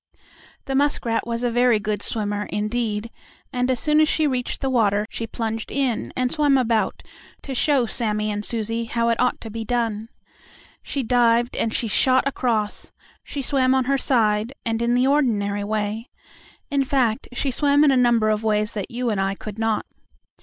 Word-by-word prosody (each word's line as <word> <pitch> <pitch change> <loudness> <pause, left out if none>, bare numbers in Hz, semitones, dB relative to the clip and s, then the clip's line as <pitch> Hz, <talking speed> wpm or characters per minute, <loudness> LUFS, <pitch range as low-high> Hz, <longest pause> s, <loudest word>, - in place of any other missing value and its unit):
The 270 - -3
muskrat 265 -5 0
was 235 +1 -3
a 245 - +1
very 245 -2 +3
good 210 -1 -2
swimmer, 205 -1 -2
indeed, 215 +1 -2 0.4
and 250 0 0
as 255 -2 +1
soon 300 +3 +3
as 310 - +3
she 315 - +1
reached 255 -4 -1
the 270 - -2
water 210 -4 +2
she 230 - -4
plunged 225 -1 -4
in 265 -5 -1
and 255 -1 0
swam 290 -3 +3
about, 230 -3 0 0.4
to 275 - -5
show 270 -1 +2
Sammie 215 -2 -1
and 205 0 -3
Susie 230 +1 -2
how 235 0 0
it 230 - 0
ought 250 0 +1
to 225 - -8
be 225 +1 -4
done. 225 -2 -2 0.7
She 275 - -3
dived, 240 0 +2
and 225 - 0
she 230 - 0
shot 260 +5 +3
across; 225 -6 -1 0.3
she 280 - -5
swam 260 -1 +2
on 260 -1 +1
her 275 +1 +2
side, 220 -2 +1
and 225 0 -1
in 235 +1 +2
the 250 +1 +3
ordinary 215 -8 +1
way. 215 +2 -3 0.6
In 280 -1 +2
fact, 255 -4 0
she 265 +2 -1
swam 285 +2 +3
in 295 - +5
a - - +3
number 235 -3 +3
of 215 +1 -1
ways 210 -1 +1
that 205 -3 -5
you 240 0 -2
and 200 -2 0
I 195 0 -1
could 210 +1 -8
not. 225 -1 0
235 Hz, 190 wpm, -22 LUFS, 215-255 Hz, 0.7 s, in